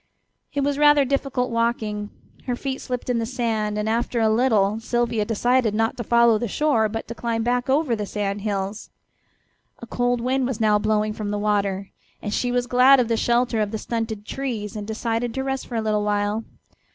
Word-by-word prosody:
It 285 Hz, -, -1 dB
was 285 Hz, 0 st, 0 dB
rather 295 Hz, -1 st, +6 dB
difficult 270 Hz, -2 st, -1 dB
walking. 220 Hz, -3 st, -1 dB, 0.4 s
Her 245 Hz, -, 0 dB
feet 265 Hz, +1 st, -4 dB
slipped 250 Hz, -2 st, -4 dB
in 245 Hz, -2 st, +1 dB
the 230 Hz, -, -1 dB
sand, 220 Hz, -4 st, -1 dB
and 210 Hz, 0 st, -1 dB
after 235 Hz, +2 st, 0 dB
a 220 Hz, -1 st, +3 dB
little 220 Hz, -3 st, +2 dB
Sylvia 235 Hz, -2 st, 0 dB
decided 230 Hz, 0 st, +1 dB
not 225 Hz, +1 st, +1 dB
to 240 Hz, -, -3 dB
follow 235 Hz, -1 st, +4 dB
the 240 Hz, -, -2 dB
shore, 225 Hz, -2 st, +1 dB
but 225 Hz, +1 st, -5 dB
to 235 Hz, -, -5 dB
climb 230 Hz, -1 st, -2 dB
back 245 Hz, +2 st, 0 dB
over 275 Hz, -3 st, +2 dB
the 210 Hz, -2 st, -4 dB
sand 200 Hz, -1 st, -2 dB
hills. 200 Hz, 0 st, -3 dB, 0.9 s
A -, -, -9 dB
cold 245 Hz, +1 st, 0 dB
wind 255 Hz, +2 st, 0 dB
was 255 Hz, -4 st, -3 dB
now 210 Hz, -2 st, +3 dB
blowing 215 Hz, 0 st, +1 dB
from 210 Hz, -1 st, -4 dB
the 205 Hz, -, -1 dB
water, 200 Hz, -2 st, -1 dB, 0.3 s
and 210 Hz, -, -4 dB
she 245 Hz, +2 st, 0 dB
was 245 Hz, 0 st, +1 dB
glad 255 Hz, +2 st, +6 dB
of 240 Hz, -2 st, +1 dB
the 230 Hz, -, +2 dB
shelter 235 Hz, 0 st, +1 dB
of 210 Hz, -, 0 dB
the 220 Hz, -, -3 dB
stunted 225 Hz, -2 st, -4 dB
trees, 230 Hz, -5 st, -4 dB
and 210 Hz, -1 st, -5 dB
decided 230 Hz, +2 st, -2 dB
to 265 Hz, -, -1 dB
rest 270 Hz, 0 st, -3 dB
for 240 Hz, -, -6 dB
a 225 Hz, -, +1 dB
little 215 Hz, -1 st, 0 dB
while. 205 Hz, +1 st, 0 dB
230 Hz, 205 wpm, -23 LUFS, 210-245 Hz, 0.9 s, rather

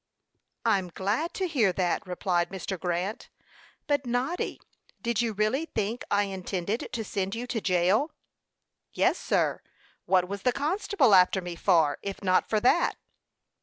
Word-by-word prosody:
"I'm 195 Hz, -5 st, +2 dB
glad 205 Hz, -, -1 dB
to 380 Hz, -, -1 dB
hear 245 Hz, -, +2 dB
that," 180 Hz, 0 st, -1 dB
replied 180 Hz, -1 st, 0 dB
Mr. 190 Hz, -1 st, -5 dB
Grant. 180 Hz, +4 st, -3 dB, 0.6 s
"But 285 Hz, -3 st, 0 dB
Noddy, 250 Hz, +9 st, -1 dB, 0.4 s
did 235 Hz, -1 st, 0 dB
you 235 Hz, -1 st, 0 dB
really 215 Hz, +9 st, 0 dB
think 220 Hz, +3 st, -1 dB
I 205 Hz, 0 st, +3 dB
intended 195 Hz, +2 st, -3 dB
to 235 Hz, -3 st, -3 dB
send 195 Hz, -1 st, -3 dB
you 240 Hz, +2 st, -4 dB
to 240 Hz, -3 st, -3 dB
jail?" 190 Hz, -, +2 dB, 0.8 s
"Yes, -, -, +2 dB
sir; -, -, 0 dB, 0.4 s
what 185 Hz, -1 st, +3 dB
was 200 Hz, +1 st, -5 dB
the 250 Hz, -, +2 dB
constable 300 Hz, -, +2 dB
after 185 Hz, +1 st, +6 dB
me 175 Hz, -2 st, -6 dB
for, 165 Hz, -5 st, +3 dB
if 200 Hz, 0 st, -6 dB
not 185 Hz, -1 st, +2 dB
for 215 Hz, -, +2 dB
that?" 255 Hz, +8 st, +3 dB
205 Hz, 150 wpm, -28 LUFS, 185-245 Hz, 0.8 s, after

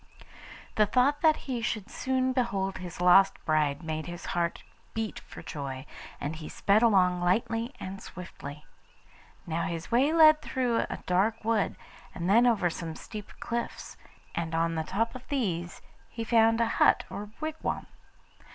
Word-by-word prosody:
The 215 Hz, -1 st, +5 dB
thought 265 Hz, +6 st, +2 dB
that 315 Hz, -2 st, +5 dB
he 250 Hz, -4 st, -2 dB
should 225 Hz, -3 st, -2 dB
soon 260 Hz, 0 st, 0 dB
behold 200 Hz, -7 st, -1 dB
his 180 Hz, -2 st, -8 dB
lost 190 Hz, +2 st, +6 dB
bride 150 Hz, -1 st, +1 dB
made 155 Hz, 0 st, -3 dB
his 175 Hz, 0 st, -7 dB
heart 170 Hz, -1 st, -1 dB, 0.3 s
beat 220 Hz, -1 st, -3 dB
for -, -, -12 dB
joy, 135 Hz, -3 st, -5 dB, 0.3 s
and 150 Hz, +3 st, -3 dB
he 155 Hz, -1 st, -8 dB
sped 205 Hz, +2 st, +3 dB
along 185 Hz, -6 st, +4 dB
lightly 225 Hz, +6 st, +1 dB
and 190 Hz, +1 st, -6 dB
swiftly. 150 Hz, -5 st, -9 dB, 0.8 s
Now 165 Hz, 0 st, -1 dB
his 165 Hz, +3 st, -5 dB
way 260 Hz, +6 st, +4 dB
led 310 Hz, -2 st, +7 dB
through 245 Hz, -3 st, 0 dB
a -, -, -4 dB
dark 210 Hz, +5 st, +1 dB
wood, 225 Hz, -3 st, +1 dB, 0.4 s
and 175 Hz, -1 st, -3 dB
then 230 Hz, +5 st, +5 dB
over 220 Hz, -7 st, +3 dB
some 165 Hz, -1 st, -5 dB
steep 210 Hz, -2 st, -8 dB
cliffs, 235 Hz, 0 st, -4 dB, 0.4 s
and 165 Hz, -1 st, -2 dB
on 165 Hz, 0 st, +1 dB
the 160 Hz, -1 st, -1 dB
top 225 Hz, +6 st, -1 dB
of 255 Hz, 0 st, -10 dB
these 180 Hz, -12 st, -2 dB, 0.3 s
he 230 Hz, -, -5 dB
found 225 Hz, 0 st, +4 dB
a 230 Hz, -, +4 dB, 0.2 s
hut -, -, +5 dB
or 205 Hz, 0 st, -6 dB
wigwam. 310 Hz, 0 st, -3 dB
200 Hz, 160 wpm, -29 LUFS, 170-235 Hz, 0.8 s, led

